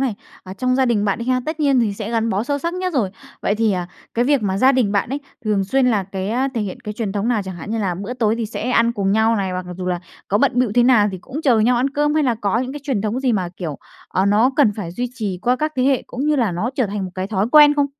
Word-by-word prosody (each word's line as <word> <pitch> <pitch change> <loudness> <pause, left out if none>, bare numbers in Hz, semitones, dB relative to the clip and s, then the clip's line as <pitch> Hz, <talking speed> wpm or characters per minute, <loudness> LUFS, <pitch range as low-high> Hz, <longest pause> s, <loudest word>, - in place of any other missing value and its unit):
này, 260 -5 0 0.3
à, 185 - -8
trong 255 +4 0
gia 265 - +3
đình 220 -4 +1
bạn 200 -2 0
đi 235 - -4
ha, 255 0 +1
tất 315 0 -3
nhiên 275 -4 +3
thì 220 -3 +1
sẽ 210 +1 -5
gắn 230 -1 0
bó 200 +2 0
sâu 285 +2 -1
sắc 335 +4 -3
nhất 365 0 -2
rồi. 220 -9 +1 0.3
Vậy 205 - +1
thì, 220 -1 +1
à, 180 -2 -2 0.3
cái 240 - +2
việc 280 -2 +2
mà 195 -1 0
gia 260 +5 +5
đình 245 -6 +1
bạn 200 +1 +1
ấy 275 +3 -3 0.2
thường 205 -2 +1
xuyên 260 +6 +2
là 220 -5 +2
cái, 190 +1 -5
a, 255 +4 +1
thể 230 - -1
hiện 205 +3 -5
cái 210 -4 -6
truyền 210 -3 -3
thống 210 +3 -1
nào 225 -4 +1
chẳng 185 -2 -6
hạn 190 - -8
như 225 - -1
là 190 -4 -1
bữa 200 +7 -5
tối 225 -3 +1
thì 230 -1 -2
sẽ 230 +3 -4
ăn 235 -1 +3
cùng 200 -3 0
nhau 220 +1 +3
này, 195 -2 -1
hoặc 180 0 -4
mặc 180 - -6
dù 180 - -4
là 180 -1 -1 0.3
có 205 - +2
bận - - +3
bịu 250 -4 +2
thế 245 - +5
nào 240 -4 +5
thì 185 - -5
cũng 270 - -7
chờ 250 -7 +4
nhau 240 +3 +3
ăn 260 +3 +1
cơm, 295 +1 +1
hay 310 - +3
là 250 -4 +2
có 210 0 0
những 255 +2 -3
cái 295 - -7
truyền 270 -7 -1
thống 220 +4 -1
gì 260 -2 +1
mà, 185 -5 0
kiểu, 155 -6 -5 0.3
ờ, 190 +1 +1
nó 215 +6 +4
cần 255 -8 +4
phải 185 -6 -5
duy 245 +6 -3
trì 205 -7 -3
qua 250 +1 +2
các 305 +3 -2
thế 255 - +2
hệ 265 -1 +2
cũng 265 +4 -4
như 300 0 +2
là 230 -8 +1
nó 210 +8 -2
trở 255 -4 +1
thành 200 0 -3
một 185 - -6
cái 185 0 -3
thói 200 0 0
quen 295 -1 +8
không? 285 -1 +2
230 Hz, 325 wpm, -20 LUFS, 200-255 Hz, 0.3 s, quen